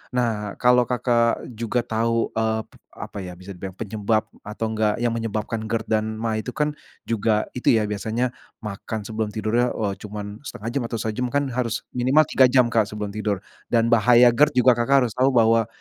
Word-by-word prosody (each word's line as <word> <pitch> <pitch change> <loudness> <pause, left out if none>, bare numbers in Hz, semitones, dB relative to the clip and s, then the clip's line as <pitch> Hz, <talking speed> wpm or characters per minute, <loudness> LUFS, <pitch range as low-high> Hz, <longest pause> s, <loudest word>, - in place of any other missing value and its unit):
nah 110 -4 -1
kalau 125 -1 +4
Kakak 120 -1 +1
juga 115 +1 -2
tahu, 115 0 0
eee, 110 0 0 0.3
apa - - -7
ya 90 -2 -7
bisa 90 +3 -11
dibilang 95 0 -8
penyebab 110 +1 -1 0.2
atau 110 +2 -4
enggak 110 -1 +1
yang 120 - +2
menyebabkan 110 -1 -3
GERD 115 0 -1 0.2
dan 110 0 -4
maag 110 0 -2
itu 125 - -5
kan 150 0 +1 0.3
juga 110 -1 +1
itu 125 - -7
ya 110 - +2
biasanya 110 +4 -2 0.3
makan 105 +1 -5
sebelum 110 +1 -3
tidurnya, 115 +3 +1
eee, 105 -3 -1
cuman 105 0 -7
1/2 110 +2 -6
jam 130 +1 -1
atau 115 - -4
sejam 115 +3 -2
kan 140 +4 0
harus 120 -2 -2
minimal 130 +5 +3
3 130 - +5
jam 125 -2 +3
Kak 110 -3 +2
sebelum 105 -1 -5
tidur 105 -2 -2 0.2
dan 115 0 +2
bahaya 120 +2 +6
GERD 145 +6 +3
juga 125 - +7
Kakak 120 +4 +3
harus 120 - -1
tahu 130 +3 +2
bahwa, 115 -1 +4
115 Hz, 185 wpm, -23 LUFS, 105-120 Hz, 0.3 s, juga